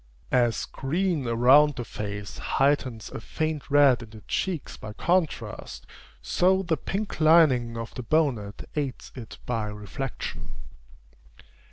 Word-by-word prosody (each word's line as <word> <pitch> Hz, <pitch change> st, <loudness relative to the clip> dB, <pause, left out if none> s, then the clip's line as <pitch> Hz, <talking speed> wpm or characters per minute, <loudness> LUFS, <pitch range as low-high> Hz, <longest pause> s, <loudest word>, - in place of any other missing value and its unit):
As 120 Hz, -3 st, +2 dB
green 160 Hz, 0 st, -1 dB
around 130 Hz, +5 st, +5 dB
the 120 Hz, -2 st, -5 dB
face 105 Hz, -2 st, -6 dB
heightens 135 Hz, -5 st, 0 dB
a -, -, -6 dB
faint 155 Hz, +3 st, -3 dB
red 140 Hz, -4 st, +5 dB
in 115 Hz, -, -10 dB
the 110 Hz, 0 st, -12 dB
cheeks 175 Hz, -, -3 dB
by 110 Hz, -, -8 dB
contrast, 170 Hz, +5 st, -1 dB, 0.4 s
so 190 Hz, +2 st, +2 dB
the 170 Hz, -3 st, +1 dB
pink 195 Hz, +5 st, -4 dB
lining 140 Hz, -8 st, +5 dB
of 115 Hz, 0 st, -6 dB
the -, -, -5 dB
bonnet 120 Hz, -7 st, 0 dB
aids 140 Hz, -4 st, -3 dB
it 120 Hz, -4 st, -9 dB
by 115 Hz, -3 st, -1 dB
reflection. 105 Hz, -, -6 dB
135 Hz, 130 wpm, -26 LUFS, 115-155 Hz, 0.4 s, around